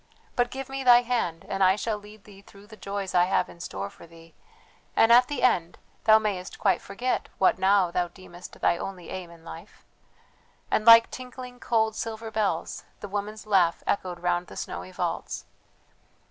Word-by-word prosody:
but 245 -1 +2
give 270 +1 -6
me 270 0 -5
thy 245 -1 +7
hand 230 -9 -2
and 195 - 0
I 185 0 +5
shall 215 +1 -2
lead 210 0 -15
thee 200 -2 -15
through 200 0 -17
the 215 +1 -13
joys 200 -2 -5
I 175 0 +5
have 190 - +1
in 170 - -14
store 100 - -5
for - - -15
thee, 165 0 -17 0.6
and 225 - +5
at 245 +1 +7
the 290 -4 -4
end 175 -9 +2 0.3
thou 220 0 +8
mayest 200 -4 -3
quite 195 - +1
forget 245 +6 -3
what 190 -1 +3
now 190 -2 +3
thou 175 0 0
deemest 180 0 -13
thy - - +3
only 185 -3 -7
aim 185 -2 -6
in 170 -1 -16
life;" 80 - -12 0.9
and 215 - +1
like 230 0 +8
tinkling, 250 -1 -9
cold, 220 -3 +1
silver 225 0 -5
bells 205 -7 -2 0.2
the 205 - -7
woman's 205 +2 -5
laugh 185 -5 +2
echoed 180 -3 -2
round 175 0 0
the - - -11
snowy 90 +2 -6
vaults. - - -4
200 Hz, 185 wpm, -26 LUFS, 180-225 Hz, 0.9 s, thou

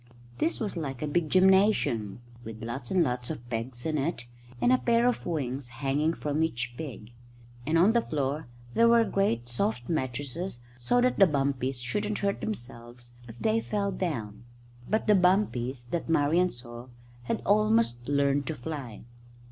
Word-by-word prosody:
This 330 - 0
was 210 -4 -3
like 140 -5 -4
a - - -1
big 155 +1 0
gymnasium, 185 - +3 0.2
with 110 0 -8
lots 120 +1 -5
and 185 -2 +3
lots 125 0 -2
of 120 - -6
pegs 120 +2 -4
in 155 -2 0
it, 135 -4 -2 0.3
and 245 - +4
a 255 - +4
pair 235 0 +3
of 245 - -1
wings 135 -5 -2
hanging 140 +6 0
from 150 +1 -2
each 125 -6 -1
peg; 120 -6 -8 0.6
and 160 +2 +3
on 190 +7 +5
the 235 - +4
floor 145 - -2 0.3
there 230 - +5
were 230 0 +6
great 160 - 0
soft 120 0 -2
mattresses 140 +2 -3 0.2
so 245 - +2
that 250 +1 +2
the 195 - +8
bumpies 135 -3 -1
shouldn't 210 - -2
hurt 200 -1 -1
themselves 120 - -7
if 115 0 -11
they 225 +1 +1
fell 200 -2 -1
down. 120 - -4 0.5
But 220 - +1
the 210 - +5
bumpies 180 - +2
that 170 -1 -2
Marian 165 +3 +3
saw 120 0 -10 0.4
had - - -2
almost 215 - +2
learned 140 -1 +2
to 160 - -2
fly. 130 -4 -6
145 Hz, 165 wpm, -28 LUFS, 120-190 Hz, 0.6 s, the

